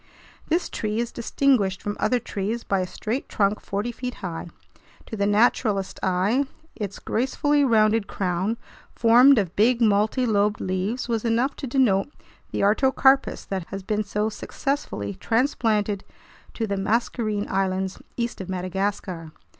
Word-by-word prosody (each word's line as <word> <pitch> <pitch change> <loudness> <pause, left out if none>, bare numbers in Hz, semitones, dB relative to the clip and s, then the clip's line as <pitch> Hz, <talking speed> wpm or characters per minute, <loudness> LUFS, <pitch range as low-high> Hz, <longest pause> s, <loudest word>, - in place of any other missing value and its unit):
This 335 +3 +1
tree 215 0 -3
is 235 0 -1
distinguished 235 -5 +1
from 205 0 -2
other 250 - +2
trees 220 0 -3
by 195 - 0
a 185 - -1
straight 225 +8 -4
trunk 205 0 +1
forty 205 +4 -3
feet 250 +1 -5
high. 170 -2 -5 0.6
To - - -6
the 200 -1 +1
naturalist's 205 -2 +2
eye, 195 +9 +2 0.3
its 200 -3 -5
gracefully 285 +4 +1
rounded 220 -3 +3
crown, 190 +4 -1 0.4
formed 245 +4 +6
of 190 -5 0
big 235 +3 +3
multilobed 210 -1 +2
leaves, 190 +7 -2
was 230 -2 -1
enough 235 +4 +1
to 275 - -5
denote 235 -5 +2 0.4
the - - -2
artocarpus 265 +5 +3
that 190 -3 -3
has 195 0 -6
been 215 +2 -1
so 210 +1 -1
successfully 220 - -3
transplanted 220 - 0 0.5
to 225 - -1
the 200 -2 -2
Mascarene 215 0 0
Islands 190 0 -1 0.2
east 235 -4 -2
of 190 - -7
Madagascar. 185 -2 -3
215 Hz, 140 wpm, -24 LUFS, 195-240 Hz, 0.6 s, formed